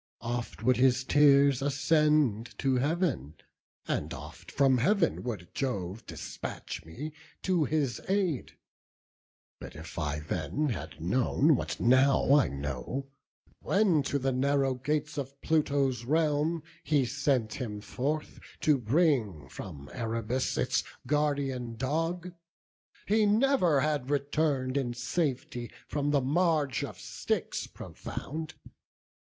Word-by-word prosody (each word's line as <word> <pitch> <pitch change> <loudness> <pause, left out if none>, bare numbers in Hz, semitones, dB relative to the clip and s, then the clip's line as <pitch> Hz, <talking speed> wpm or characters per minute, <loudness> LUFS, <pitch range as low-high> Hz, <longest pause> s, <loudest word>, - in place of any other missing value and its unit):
Oft 120 -2 -4
would 125 0 +4
his 130 0 +4
tears 140 -1 +5
ascend 145 -4 +2
to 135 -2 +1
Heav'n, 140 - 0 0.5
and - - -1
oft - - -10
From 135 -2 +3
Heav'n 190 - +2
would 105 -8 -5
Jove 105 -6 -3
despatch - - -6
me 135 - -7 0.3
to 180 -5 +2
his 140 -5 0
aid; 190 -8 0 1.1
But - - -9
if 80 +2 -8
I 75 -2 -1
then 90 - -1
had 80 - -5
known 130 - +3
what - - -3
now 130 +2 +4
I 145 -2 +5
know, 70 - -4 0.5
When 190 -6 +3
to 140 - +1
the 135 0 0
narrow 135 +1 +2
gates 150 +3 -2
of 140 0 -6
Pluto's 140 -6 +1
realm 155 +3 +1 0.2
He 145 -2 +2
sent 130 -3 0
him 110 -6 -4
forth 145 +8 -3 0.2
to 150 -3 +4
bring 120 - +1
from 70 +2 -8
Erebus 115 +1 -1
Its - - +1 0.2
guardian 140 -4 0
dog, 165 +8 -2 0.7
he 215 +1 +3
never 210 - +3
had 145 -3 0
return'd 140 -2 0
In 120 -3 -1
safety 125 -3 -2 0.2
from 145 -1 -1
the 145 -1 +3
marge 150 -1 +1
of - - -6
Styx - - -2
profound. 160 +2 -7
140 Hz, 120 wpm, -30 LUFS, 120-150 Hz, 1.1 s, tears